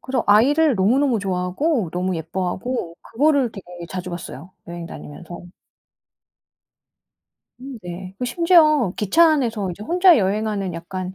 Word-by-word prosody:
그래서 260 -2 -2
아이를 275 +7 +4
너무너무 240 +6 +2
좋아하고 190 - -1
너무 180 +1 -2
예뻐하고 180 +4 -4
그거를 280 -1 +1
되게 195 -3 -11 0.2
자주 180 +2 -6
봤어요, 175 -1 -9 0.2
여행 170 0 -7
다니면서. 170 +2 -10 2.1
음 265 -1 -9
네. 180 +1 -8
그 - - -3
심지어 305 - +3
기차 270 - +4
안에서 225 -9 -1
이제 180 +4 -9
혼자 355 - +4
여행하는 200 -2 -1
약간 185 +2 -6
205 Hz, 305 characters per minute, -21 LUFS, 180-270 Hz, 2.1 s, 아이를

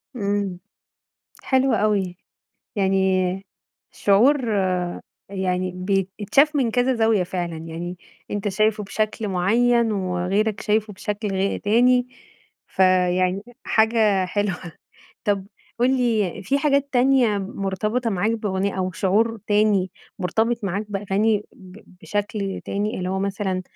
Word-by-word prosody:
إمم، 200 -4 -2 0.8
حلو 265 -1 +2
أوي، 200 -4 +1 0.6
يعني 190 -1 +1 0.5
شعور 245 +6 +3 0.8
يعني 185 -1 -1 0.5
بيتشاف 280 +9 +3
من 255 -5 +1
كذا 245 +3 +2
زاوية 225 -4 +3
فعلًا 175 -2 -4
يعني، 165 +2 -6 0.3
أنت 205 0 -2
شايفه 215 +2 +1
بشكل 215 +2 -2
معيّن، 225 +5 +2
وغيرك 195 +2 -1
شايفه 215 0 0
بشكل 210 +2 -4
غي 195 +1 -1
تاني 245 +4 +3 0.6
فيعني 185 0 +2 0.2
حاجة 220 -4 +3
حلوة 195 0 -1 0.7
طب 200 -2 0 0.3
قُل 255 +2 +3
لي 220 -7 0
في 270 +9 +1
حاجات 280 -1 +2
تانية 250 -4 +3
مرتبطة 200 +5 -2
معاك 200 +2 0
بأغنية 200 -3 -2
أو 185 0 -1
شعور 215 +5 +1
تاني 205 -3 +2 0.3
مرتبط 220 +5 0
معاك 200 +2 -2
بأغاني 205 +1 0
ب 185 0 -14 0.2
بشكل 205 -1 -3
تاني، 205 +2 -2
اللي 180 0 -3
هو 190 - -1
مثلًا 190 -1 -2
205 Hz, 115 wpm, -23 LUFS, 190-225 Hz, 0.8 s, شعور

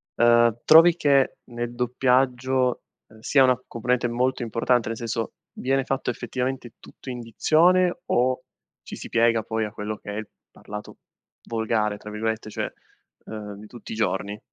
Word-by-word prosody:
Uhm, 120 -1 +4
trovi 165 +2 +8
che 140 -5 +2
nel 120 0 -5
doppiaggio, 125 +1 +1 0.3
ehm, 110 - -17
sia 135 +4 +4
una 125 -1 +3
componente 120 +1 0
molto 125 +2 0
importante, 115 +1 +1
nel 115 0 -3
senso: 115 -1 -3 0.3
viene 135 +1 +1
fatto 135 -1 -2
effettivamente 125 +1 -3
tutto 130 - -10
in 125 - -6
dizione 175 - +3
o 130 +1 +1 0.4
ci - - -9
si - - -9
piega, 115 -1 +3
poi, 110 -1 -2
a 105 - -6
quello 105 0 -5
che - - -11
è - - -5
il 110 - -5 0.2
parlato 105 0 -9 0.5
volgare, 110 -2 0
tra 105 - -10
virgolette, 110 0 -3
cioè, - - -4 0.6
ehm, 105 -2 -7
di 105 - -11
tutti 120 +2 -11
i - - -5
giorni? 100 0 -1
120 Hz, 160 wpm, -24 LUFS, 110-130 Hz, 0.6 s, trovi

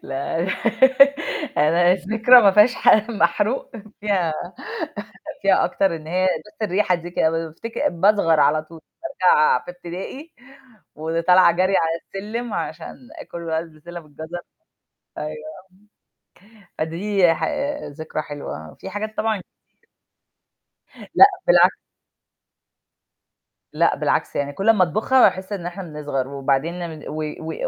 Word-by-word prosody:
لا 140 +4 -4
أنا 185 +3 -1 1.0
أنا 170 +4 +4
الذكرى 220 +6 +5
ما 200 - +6
فيهاش 210 +5 +5
حاجة 215 +2 +3
محروق 205 +5 0 0.3
فيها 195 -6 0 1.1
فيها - - +3
أكتر 190 -4 0
إن 155 0 -12
هي 185 +3 0 0.2
بس 210 - -16
الريحة 200 -1 +1
دي 175 0 -6
ك - - -11
بافتكر 165 +7 -1
باصغر 175 -3 +2
على 155 +1 +3
طول، 160 +1 -14 0.2
بارجع 180 - +2
في - - -8
ابتدائي 180 - -9 0.6
وطالعة 165 +3 +3
جري 185 +3 +1
على 165 0 0
السلِّم 215 +4 -6
عشان 165 -1 -5 0.2
آكل 170 - -9
بقى 160 0 -1
البسلة 165 +1 -10
بالجزر، 160 +3 -9 0.8
أيوه 150 - -3 1.3
آه، 190 - -24 0.2
فدي 175 +2 +1
ح - - -6 0.4
ذكرى 155 +1 -6
حلوة، 140 - -8
في - - -8
حاجات 215 +2 -6
طبعًا 220 -4 -1 1.7
لأ، 390 - +10 0.2
بالعكس. - - +5 1.9
لأ، - - +2
بالعكس - - -1
يعني 145 0 -2
كل 195 +8 0
أمّا 215 -4 +5
أطبخها 215 +10 +2
باحس 190 +2 -10
إن 180 -4 -5
إحنا 180 +2 -6
بنصغر 150 -5 -4
وبعدين 140 +6 -2
ن - - -13
و 155 - -5 0.2
و 160 0 -6
175 Hz, 125 wpm, -21 LUFS, 160-205 Hz, 1.9 s, لأ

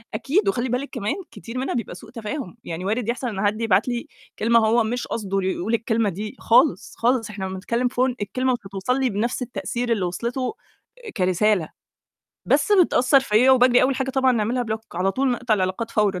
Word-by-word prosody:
أكيد، 375 +10 +1
وخلّي 250 -8 -1
بالِك 250 +4 -2
كمان 215 -4 -2 0.2
كتير 230 +2 -8
منها 260 +2 -2
بيبقى 230 -6 -4
سوء 220 +5 -12
تفاهم، 230 - -6
يعني 170 +2 -5
وارد 220 +3 -1
يحصَل 250 +2 -2
إن 200 -2 -2
حد 210 +2 0
يبعت 210 -2 +2
لي 240 -1 -3 0.3
كلمة 230 +2 +4
هو 230 +2 +3
مش 240 +3 -3
قصده 195 -3 -2
يقول 190 +3 -2
الكلمة 225 -1 +1
دي 205 +4 -6
خالص، 250 +5 +3
خالص، 235 -1 +1
إحنا 200 -2 -5
لمّا 190 0 -5
نتكلّم 235 +6 -1
Phone 255 0 0
الكلمة 255 +6 0
مش 240 - -2
هتوصَل 200 +7 -1
لي 265 -1 +1
بنفْس 230 +5 -2
التأثير 245 -1 -3
اللي 205 -5 +1
وِصلِته 240 - -3 0.6
كرسالة، 185 -1 +2 0.8
بس 420 - +2
بتأثّر 280 -8 +5
فيَّ 245 0 +3
وباجري 250 -1 +5
أول 265 +1 +2
حاجة 265 0 -1
طبعًا 265 -1 +3
نعملها 240 +2 0
block، 220 -1 -3
على 190 +2 0
طول 265 +3 +1
نقطَع 245 -2 +1
العلاقات 190 +3 -2
فورًا، 205 -3 +1
230 Hz, 195 wpm, -23 LUFS, 205-255 Hz, 0.8 s, بتأثّر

